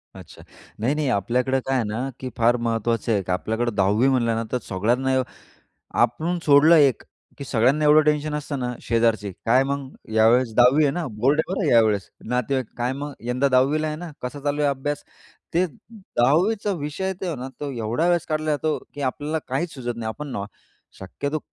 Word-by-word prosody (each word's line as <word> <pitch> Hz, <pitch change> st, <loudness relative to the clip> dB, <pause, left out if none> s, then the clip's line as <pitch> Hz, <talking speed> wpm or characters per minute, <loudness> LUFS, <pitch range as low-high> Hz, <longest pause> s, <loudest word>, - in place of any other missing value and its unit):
अच्छा. -, -, -13 dB, 0.4 s
नाही, 120 Hz, +6 st, +1 dB
नाही, 150 Hz, -2 st, -1 dB
आपल्याकडे 125 Hz, +5 st, +1 dB
काय 135 Hz, -, 0 dB
आहे 125 Hz, -, +1 dB
ना, 120 Hz, +6 st, -3 dB
की 130 Hz, -, -5 dB
फार 120 Hz, +1 st, +3 dB
महत्वाचं 115 Hz, 0 st, -1 dB
आहे. 100 Hz, -3 st, +1 dB
आपल्याकडे 110 Hz, +6 st, -1 dB
10वी 100 Hz, +5 st, +3 dB
म्हणलं 120 Hz, -4 st, +2 dB
ना, 115 Hz, -, -1 dB
तर 125 Hz, -, +1 dB
सगळ्यांना 125 Hz, +7 st, +1 dB, 0.8 s
आपण 155 Hz, +10 st, +1 dB
सोडलं 150 Hz, +3 st, +6 dB
एक, 140 Hz, -6 st, +4 dB, 0.4 s
की 140 Hz, -, -6 dB
सगळ्यांना 130 Hz, +5 st, +2 dB
एवढं 150 Hz, +1 st, +7 dB
टेन्शन 150 Hz, 0 st, +1 dB
असतं 150 Hz, -1 st, -4 dB
ना, 125 Hz, -1 st, -2 dB
शेजारचे, 115 Hz, -3 st, +1 dB, 0.2 s
"काय 125 Hz, +3 st, +5 dB
मग 140 Hz, 0 st, -3 dB, 0.3 s
यावेळेस 115 Hz, +2 st, +4 dB
10वी 125 Hz, +6 st, +5 dB
आहे 145 Hz, -, +3 dB
ना, 175 Hz, +1 st, -3 dB
बोर्ड 130 Hz, +8 st, +2 dB
आहे 170 Hz, -, -4 dB
बरं 190 Hz, -5 st, -1 dB
यावेळेस." 110 Hz, -4 st, +3 dB, 0.2 s
नातेवाईक, 125 Hz, +1 st, 0 dB
"काय 120 Hz, +1 st, -1 dB
मग 145 Hz, +2 st, -5 dB, 0.2 s
यंदा 125 Hz, +3 st, +2 dB
10वी 135 Hz, +4 st, +3 dB
ला -, -, -1 dB
आहे 150 Hz, 0 st, -3 dB
ना, 175 Hz, +1 st, -7 dB
कसा 125 Hz, +3 st, -5 dB
चालू 145 Hz, 0 st, 0 dB
आहे 145 Hz, -, +3 dB
अभ्यास?" 145 Hz, +2 st, -3 dB, 0.5 s
ते 175 Hz, +2 st, +3 dB
10वी 180 Hz, -, 0 dB
चा 205 Hz, -, +1 dB
विषय 150 Hz, +5 st, -4 dB
आहे 190 Hz, -, 0 dB
तो 175 Hz, -3 st, -2 dB
ना, 130 Hz, +1 st, -6 dB
तो 145 Hz, -1 st, -3 dB
एवढा 120 Hz, +5 st, -1 dB
वेळेस 175 Hz, -1 st, +1 dB
काढला 155 Hz, 0 st, -1 dB
जातो, 150 Hz, +1 st, 0 dB, 0.2 s
की 145 Hz, -, -7 dB
आपल्याला 150 Hz, +4 st, -3 dB
काहीच 160 Hz, +6 st, -2 dB
सुचत 120 Hz, -3 st, -4 dB
नाही. 115 Hz, -1 st, -4 dB
आपण 145 Hz, +7 st, -6 dB
न 100 Hz, -, -3 dB, 0.5 s
शक्यतो 140 Hz, +11 st, -4 dB
130 Hz, 190 wpm, -23 LUFS, 120-150 Hz, 0.8 s, एवढं